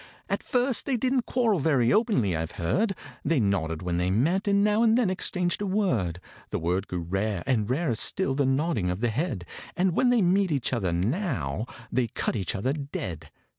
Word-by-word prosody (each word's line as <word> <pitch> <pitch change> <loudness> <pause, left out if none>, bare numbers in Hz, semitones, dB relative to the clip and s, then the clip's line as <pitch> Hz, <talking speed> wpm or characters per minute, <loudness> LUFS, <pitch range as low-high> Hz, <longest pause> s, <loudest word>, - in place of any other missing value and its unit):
At - - 0
first 250 -1 +1
they 265 -3 +1
didn't 255 +1 0
quarrel 230 -7 +1
very 135 -6 +2
openly, 200 - +2
I've 80 0 -3
heard; 195 - 0 0.3
They 155 -1 +2
nodded 90 -6 0
when 90 -1 -1
they 90 +1 0
met, 165 - +1
and 200 0 +3
now 210 +1 +3
and 230 0 +4
then 230 -7 +2
exchanged 180 0 0
a 205 - -1
word: 125 - 0 0.3
The - - -2
word 90 +4 -1
grew 90 -1 -3
rare, 95 +2 -2
and 115 -5 0
rarer 140 +1 0
still 135 - +2
the 140 0 +1
nodding 135 - 0
of 90 +3 -3
the 120 - +2
head, 120 - -2 0.3
And 180 0 +2
when 250 - +3
they 240 -4 +3
meet 185 +1 +2
each 135 -3 0
other 100 -8 0
now, 105 - -1 0.2
they 125 -2 +1
cut - - -2
each 95 -6 -1
other 125 +8 -1
dead. 95 - -6
135 Hz, 200 wpm, -26 LUFS, -, 0.3 s, and